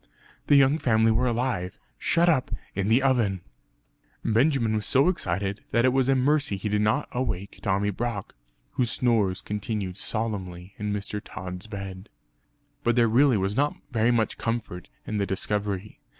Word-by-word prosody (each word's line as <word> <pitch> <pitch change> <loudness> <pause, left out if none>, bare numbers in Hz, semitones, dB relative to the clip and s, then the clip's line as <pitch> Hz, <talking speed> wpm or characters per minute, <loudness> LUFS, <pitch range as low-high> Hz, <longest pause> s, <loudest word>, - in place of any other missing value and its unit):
The 145 - +6
young 140 +2 +5
family 110 -3 +3
were 120 +3 +2
alive; 120 -7 -1 0.2
shut 170 +1 +2
up 150 -7 +2 0.2
in 95 0 -1
the 120 +5 +4
oven! 115 -9 +2 0.8
Benjamin 115 0 +2
was 105 -1 -1
so 140 +5 +4
excited 100 - -2
that 115 +1 +2
it 130 - +3
was 130 0 +2
a 135 - +4
mercy 140 -4 +2
he 100 +3 -3
did 105 0 +1
not 105 +1 +1
awake 100 -6 -3
Tommy 100 +1 +1
Brock, 115 -1 -4 0.4
whose 120 -2 0
snores 110 -8 +1
continued 105 -3 -3
solemnly 95 -5 -4
in 105 0 -2
Mr. 105 0 -3
Tod's 90 +2 -7
bed. 95 -2 -7 0.7
But 120 0 +2
there 120 -2 +4
really 125 +2 +4
was 100 +1 -1
not 145 +3 +1 0.2
very 115 -1 +2
much 115 -2 +1
comfort 115 -7 -3 0.2
in 110 - -3
the 100 -1 0
discovery. 100 0 -2
110 Hz, 165 wpm, -26 LUFS, 100-125 Hz, 0.8 s, The